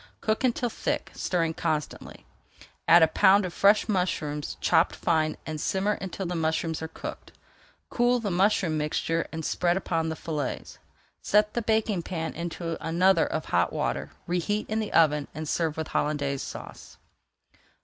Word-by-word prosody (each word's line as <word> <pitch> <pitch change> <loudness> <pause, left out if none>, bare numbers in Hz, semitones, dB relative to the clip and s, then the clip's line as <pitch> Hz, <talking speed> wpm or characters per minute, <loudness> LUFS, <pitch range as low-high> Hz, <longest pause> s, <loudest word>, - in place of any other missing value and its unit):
Cook 215 +3 -1
until 245 -1 +1
thick, - - -3
stirring 165 -3 -1
constantly. 155 -3 -4 0.6
Add 165 0 +8
a - - +6
pound 195 +3 +4
of 180 - -5
fresh 205 +3 +4
mushrooms 155 -7 -2
chopped 165 - +3
fine 155 -2 0
and 155 -1 -4
simmer 195 +2 0
until 195 -1 -4
the 180 - -3
mushrooms 160 -1 -1
are 160 - -3
cooked. 160 - -8 0.6
Cool 245 0 +2
the 210 -4 -2
mushroom 180 -3 +2
mixture 165 +2 -1
and 160 -1 -5
spread 175 0 +1
upon 165 -4 -1
the 160 - -3
fillets. 150 -4 -4 0.4
Set 210 +1 +2
the 240 - -1
baking 220 -4 +1
pan 165 -2 -4
into 170 0 -5
another 170 +1 +3
of 155 - -3
hot 90 0 +1
water, 70 +3 -2 0.2
reheat 180 +5 -1
in 220 - +1
the 215 - -3
oven, 150 -3 +3
and 155 0 -5
serve 160 0 -1
with 160 - -4
Hollandaise 145 -2 -1
Sauce. - - -9
165 Hz, 160 wpm, -27 LUFS, 155-195 Hz, 0.6 s, Add